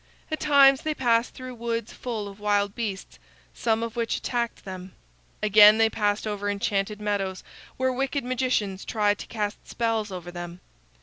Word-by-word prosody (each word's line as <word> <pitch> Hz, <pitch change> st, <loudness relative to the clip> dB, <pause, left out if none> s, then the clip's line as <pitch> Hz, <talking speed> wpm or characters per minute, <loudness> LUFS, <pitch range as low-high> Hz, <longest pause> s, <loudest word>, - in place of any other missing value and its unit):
At 310 Hz, -, -2 dB
times 275 Hz, -2 st, +6 dB
they 310 Hz, -1 st, -2 dB
passed 235 Hz, -3 st, +1 dB
through 255 Hz, -1 st, -7 dB
woods 230 Hz, -1 st, -3 dB
full 225 Hz, -5 st, -4 dB
of 200 Hz, 0 st, -11 dB
wild 205 Hz, -1 st, +1 dB
beasts, 210 Hz, -5 st, -5 dB, 0.3 s
some 225 Hz, -1 st, 0 dB
of 230 Hz, 0 st, -5 dB
which 230 Hz, -1 st, -1 dB
attacked 235 Hz, -3 st, -3 dB
them. 185 Hz, -1 st, -8 dB, 0.5 s
Again 210 Hz, 0 st, +8 dB
they 225 Hz, 0 st, +3 dB
passed 205 Hz, -1 st, 0 dB
over 205 Hz, -1 st, -2 dB
enchanted 200 Hz, +1 st, -1 dB
meadows 200 Hz, -3 st, -2 dB, 0.3 s
where 260 Hz, 0 st, +1 dB
wicked 270 Hz, +1 st, -1 dB
magicians 245 Hz, -6 st, -1 dB
tried 205 Hz, -2 st, +1 dB
to -, -, -8 dB
cast 210 Hz, -2 st, -4 dB
spells 225 Hz, -3 st, -1 dB
over 175 Hz, -1 st, -7 dB
them. 175 Hz, 0 st, -7 dB
215 Hz, 165 wpm, -26 LUFS, 205-240 Hz, 0.5 s, Again